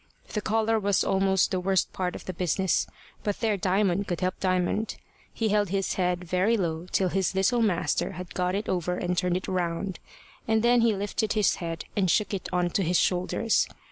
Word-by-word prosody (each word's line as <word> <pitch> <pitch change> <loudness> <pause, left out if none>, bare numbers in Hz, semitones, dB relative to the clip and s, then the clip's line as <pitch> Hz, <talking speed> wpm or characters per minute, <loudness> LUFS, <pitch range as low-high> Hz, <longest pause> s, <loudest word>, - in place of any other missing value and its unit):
The 210 - -2
collar 220 +1 +1
was 200 -2 +2
almost 190 0 +2
the 185 - 0
worst 190 0 +1
part 180 -1 -2
of - - -9
the 185 - -4
business; 180 +1 0 0.4
but 205 -1 -2
there 220 -2 +1
Diamond 195 0 +1
could 175 0 -3
help 185 0 -1
Diamond. 185 +3 0 0.4
He 225 -1 -1
held 205 -2 +2
his 195 0 0
head 180 -1 0
very 185 +6 +1
low 170 -2 -2
till 190 -2 +2
his 190 +1 0
little 215 +6 +2
master 175 -7 0
had 180 +1 -8
got 180 0 0
it 205 +2 -3
over 180 -1 -1
and 180 0 -1
turned 180 0 +1
it 185 - -6
round, 180 +1 -2 0.5
and 220 0 +2
then 240 0 +5
he 230 -2 +3
lifted 205 +2 -1
his 210 -3 +2
head, 165 -2 -5
and 190 -3 +2
shook 210 +3 +2
it 195 - -4
on 180 -1 +1
to 195 - +1
his 175 0 +2
shoulders. 185 +5 +1
190 Hz, 205 wpm, -27 LUFS, 180-205 Hz, 0.5 s, then